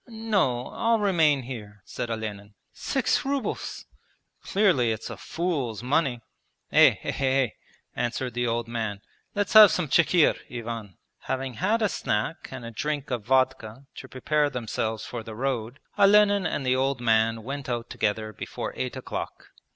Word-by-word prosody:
'No, 210 - 0
I'll 230 0 +1
remain 165 -9 +3
here,' 105 -5 -9
said 120 - -5
Olenin. 105 -2 -5 0.2
'Six 265 -3 0
rubles!... 275 -5 -3 0.6
Clearly 180 - +2
it's 110 -1 -5
a - - -5
fool's 140 - -3
money. 130 -2 +1 0.5
Eh, - - +7
eh, - - -3
eh! 135 -2 +2 0.5
answered 120 +1 -2
the 120 0 -1
old 115 0 -1
man. 110 -4 -3 0.3
'Let's 205 0 -1
have 215 -2 +11
some 180 -3 -1
chikhir, 170 +3 +4
Ivan!' 115 -5 -6 0.2
Having 130 -1 -3
had 215 - +1
a - - +4
snack 105 +5 -2
and 130 -3 -8
a 115 - -6
drink 145 +4 -3
of 120 -4 -2
vodka 130 -1 +1
to 130 - -8
prepare 150 +3 +1
themselves 115 -3 -3
for 120 - -5
the 110 -1 -9
road, 125 0 -3 0.2
Olenin 205 -1 +5
and 135 - -3
the 130 0 +3
old 135 0 0
man 115 -1 +2
went 135 +2 -5
out 120 -1 -2
together 110 -2 -1
before - - -6
eight - - -3
o'clock. - - -6
130 Hz, 155 wpm, -26 LUFS, 115-160 Hz, 0.6 s, have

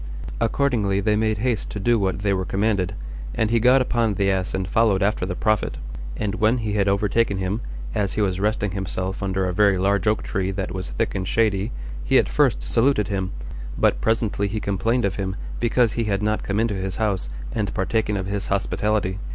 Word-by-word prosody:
Accordingly 115 -6 +1
they 105 +1 +2
made 110 0 +1
haste 115 0 -1
to 105 - -5
do 120 +3 +3
what 95 0 -1
they 100 -1 +2
were 95 -1 0
commanded, 100 -1 0 0.4
and 110 -1 +1
he 115 - +4
got 130 +3 +5
upon 115 -4 +1
the 100 0 +2
ass 95 -1 -1
and 95 -1 -2
followed 105 -3 +3
after 100 -2 0
the 90 - -3
prophet; 110 +1 0 0.4
and 100 -2 -1
when 110 +3 +4
he 110 -3 -2
had 100 -1 +2
overtaken 100 +1 +2
him, 95 +4 -2 0.3
as 100 -2 0
he 110 - 0
was 95 -2 0
resting 105 0 0
himself 95 0 -3
under 95 -1 0
a 90 - -2
very 100 0 +4
large 100 +2 +1
oak 105 0 +2
tree 95 0 -1
that 95 -1 -3
was 95 -1 -4
thick - - -1
and 95 -1 -3
shady, 105 0 +1 0.3
he - - +3
at - - +4
first - - +2
saluted 115 - +2
him, 95 -2 -1 0.5
but - - +2
presently 110 -2 +1
he 110 +2 -2
complained 115 +5 0
of 95 - -1
him, 95 -1 -2 0.2
because 120 -1 +3
he 115 - -1
had 100 -1 0
not 105 0 +1
come 100 +1 -1
into 115 -1 +1
his 95 -1 -3
house, 100 - -1 0.2
and 105 -3 -1
partaken 105 +2 0
of 95 - -3
his 100 0 -2
hospitality. 100 0 0
100 Hz, 210 wpm, -23 LUFS, 95-110 Hz, 0.5 s, got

